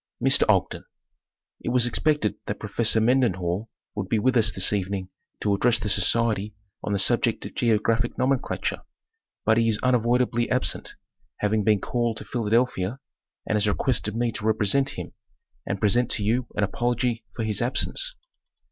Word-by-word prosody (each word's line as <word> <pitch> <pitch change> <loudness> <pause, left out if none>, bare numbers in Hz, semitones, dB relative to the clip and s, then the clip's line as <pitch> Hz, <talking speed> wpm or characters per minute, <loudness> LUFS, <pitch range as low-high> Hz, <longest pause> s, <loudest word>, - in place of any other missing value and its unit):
Mr. - - +3
Oapren: - - +1 0.8
It - - -4
was 120 -1 +3
expected 145 -2 +1
that 105 - -3
Professor 110 +1 +1
Mendenhall 110 -5 +1 0.2
would 100 -3 -4
be 115 - +2
with 130 +4 +2
us 110 -3 +4
this 95 +1 -1
evening 95 -1 -2 0.3
to 100 - +1
address 120 +4 +3
the 110 -2 -3
society 105 +1 +1 0.3
on - - -3
the 100 - +1
sub 120 +5 +2
ject 115 -3 -1
of - - -7
Geographic 115 +1 +1
Nomenclature 130 0 -1 0.6
but 110 +1 +4
he 115 - +2
is 110 - +1
unavoidably 120 -1 +2
absent, 130 0 -1 0.4
having 105 0 +1
been 105 -2 +3
called 120 -2 -1
to - - -7
Philadelphia, 115 -2 0 0.5
and - - 0
has 105 0 +2
requested 110 -1 0
me 120 0 0
to 110 - -6
represent 110 +5 +2
him, - - -6 0.5
and 100 - -2
present 120 +4 +2
to 105 - +1
you 115 +4 0
an 105 - +1
apology 120 +2 -1
for 115 - -2
his 110 0 0
absence. 140 - -1
115 Hz, 165 wpm, -25 LUFS, 105-120 Hz, 0.8 s, us